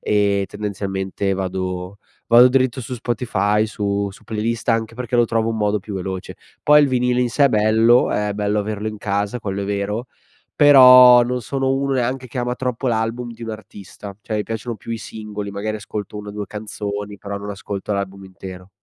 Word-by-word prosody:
ehm, 100 Hz, -1 st, +1 dB
tendenzialmente 95 Hz, -1 st, -3 dB
vado 95 Hz, 0 st, -4 dB, 0.3 s
vado 120 Hz, +2 st, +7 dB
dritto 130 Hz, -1 st, +1 dB
su 125 Hz, -, -8 dB
Spotify, 110 Hz, -3 st, 0 dB
su 100 Hz, -2 st, -2 dB
su -, -, -16 dB
playlist, 110 Hz, +1 st, -3 dB
anche 115 Hz, -1 st, 0 dB
perché 120 Hz, 0 st, -3 dB
lo 120 Hz, -, +5 dB
trovo 115 Hz, 0 st, 0 dB
un 115 Hz, -, -2 dB
modo 105 Hz, -1 st, +1 dB
più 100 Hz, +1 st, -8 dB
veloce. 95 Hz, 0 st, -5 dB, 0.3 s
Poi 150 Hz, 0 st, +6 dB
il 145 Hz, -, +3 dB
vinile 125 Hz, -1 st, +1 dB
in 120 Hz, -, -1 dB
sé 140 Hz, +4 st, +3 dB
è 140 Hz, -, +6 dB
bello, 110 Hz, +2 st, +4 dB
è 105 Hz, 0 st, -1 dB
bello 105 Hz, 0 st, 0 dB
averlo 105 Hz, +1 st, -3 dB
in 110 Hz, -1 st, -7 dB
casa, 100 Hz, +3 st, -2 dB
quello 100 Hz, -1 st, -3 dB
è -, -, -3 dB
vero, 100 Hz, +4 st, -3 dB, 0.5 s
però 125 Hz, -4 st, +8 dB
non 125 Hz, +1 st, -2 dB
sono 135 Hz, +3 st, -1 dB
uno 135 Hz, 0 st, 0 dB
neanche 130 Hz, +1 st, -1 dB
che 125 Hz, -, -10 dB
ama 125 Hz, 0 st, -1 dB
troppo 125 Hz, 0 st, -3 dB
l'album 115 Hz, +1 st, -1 dB
di 115 Hz, 0 st, -12 dB
un 115 Hz, -, -7 dB
artista, 100 Hz, -2 st, -10 dB
cioè 110 Hz, -, -5 dB
mi 105 Hz, -, 0 dB
piacciono 115 Hz, +2 st, -5 dB
più 115 Hz, -, -7 dB
i 115 Hz, -, -3 dB
singoli, 105 Hz, -2 st, -7 dB
magari 105 Hz, +2 st, -3 dB
ascolto 105 Hz, 0 st, -6 dB
1 105 Hz, 0 st, -8 dB
o -, -, -7 dB
2 105 Hz, -1 st, -5 dB
canzoni 105 Hz, -1 st, -6 dB
però 100 Hz, 0 st, -6 dB
non 100 Hz, +1 st, -8 dB
ascolto 100 Hz, 0 st, -5 dB
l'album 100 Hz, 0 st, -4 dB
intero. 95 Hz, -1 st, -10 dB
105 Hz, 200 wpm, -20 LUFS, 100-120 Hz, 0.5 s, però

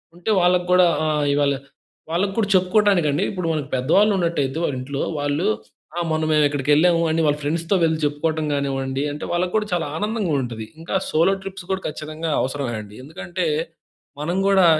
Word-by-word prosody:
ఉంటే 175 Hz, +5 st, -2 dB
వాళ్ళకి 180 Hz, 0 st, +3 dB
కూడా 180 Hz, -1 st, +6 dB, 0.2 s
ఆహ్, 150 Hz, -1 st, +1 dB
ఇవాళ 145 Hz, -1 st, +2 dB, 0.6 s
వాళ్ళకి 195 Hz, +3 st, 0 dB
కూడా 210 Hz, -, +2 dB
చెప్పుకోటానికండి 185 Hz, -5 st, +3 dB
ఇప్పుడు 180 Hz, -4 st, -3 dB
మన‌కు 150 Hz, -2 st, -3 dB
పెద్దవాళ్ళు 180 Hz, +12 st, +3 dB
ఉన్నట్టయితే 160 Hz, -5 st, 0 dB
వాళ్ళ 140 Hz, -, 0 dB
ఇంట్లో 140 Hz, +2 st, -4 dB, 0.2 s
వాళ్ళు 145 Hz, +5 st, -1 dB, 0.5 s
"ఆ! -, -, +1 dB
మొన్న 155 Hz, 0 st, 0 dB
మేము 150 Hz, -1 st, +4 dB
ఇక్కడికి 145 Hz, 0 st, -3 dB
వెళ్ళాము" 170 Hz, +2 st, +4 dB
అని 165 Hz, +1 st, +1 dB
వాళ్ళ 150 Hz, 0 st, +2 dB
ఫ్రెండ్స్‌తో 165 Hz, +6 st, 0 dB
వెళ్లి 160 Hz, -1 st, +2 dB
చెప్పుకోవడం 155 Hz, +2 st, -1 dB
కానివ్వండి 135 Hz, -1 st, -1 dB
అంటే, 150 Hz, -, -7 dB
వాళ్ళకి 180 Hz, +1 st, 0 dB
కూడా 215 Hz, -1 st, +1 dB
చాలా 170 Hz, -3 st, 0 dB
ఆనందంగా 210 Hz, -5 st, -1 dB
ఉంటది. 115 Hz, -3 st, -5 dB
ఇంకా 165 Hz, +3 st, -4 dB
సోలో 170 Hz, +5 st, +3 dB
ట్రిప్స్ 190 Hz, -1 st, -7 dB
కూడా 190 Hz, -, -1 dB
ఖచ్చితంగా 155 Hz, +2 st, -4 dB
అవసరమే 130 Hz, -2 st, -2 dB
అండి. 105 Hz, 0 st, -13 dB
ఎందుకంటే 170 Hz, +4 st, -4 dB, 0.8 s
మనం 175 Hz, +5 st, -1 dB
కూడా 195 Hz, -2 st, +5 dB
160 Hz, 170 wpm, -22 LUFS, 145-180 Hz, 0.8 s, కూడా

